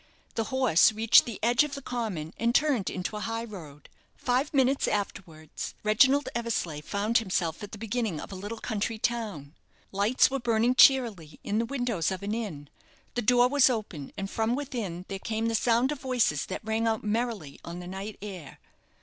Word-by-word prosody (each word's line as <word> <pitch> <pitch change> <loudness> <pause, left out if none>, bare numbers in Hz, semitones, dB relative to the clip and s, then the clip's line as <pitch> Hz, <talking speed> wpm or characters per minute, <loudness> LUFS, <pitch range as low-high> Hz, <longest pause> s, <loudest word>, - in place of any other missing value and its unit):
The 225 - -1
horse 255 - +4
reached 220 +1 +5
the 230 -5 -5
edge 240 +3 +4
of 300 -2 -4
the 280 - -7
common 210 -12 -4
and 235 +1 +1
turned 275 -10 +2
into 185 +3 -4
a - - -3
high 225 +1 -3
road. 160 -10 -10 0.3
Five 255 +4 0
minutes 270 -1 +2
afterwards 175 -6 -4
Reginald 265 +7 +4
Eversleigh 225 -10 -2
found 210 +8 +1
himself 180 -6 -2
at 205 - -7
the 215 - -7
beginning 220 -5 -2
of - - -8
a - - -6
little 205 +4 -6
country 220 +1 -2
town. 210 - -3 0.4
Lights 205 +7 +3
were 275 - -1
burning 235 0 +2
cheerily 235 - +4
in 210 +2 0
the 230 - -1
windows 245 - -1
of 190 0 -5
an 205 +1 -2
inn. 190 -11 -5 0.5
The 245 - -1
door 245 +2 +5
was 280 0 +5
open, 205 - -4
and 195 -1 -3
from 225 +4 0
within 230 -11 -4
there 195 - -5
came 220 +2 -2
the 230 - -1
sound 235 +4 +2
of 295 - -4
voices 245 - +1
that 190 - -6
rang 220 +1 0
out 220 -1 0
merrily 215 - -2
on 170 +1 -7
the 180 - -8
night 195 +3 -6
air. 185 -8 -8
220 Hz, 190 wpm, -28 LUFS, 190-245 Hz, 0.5 s, reached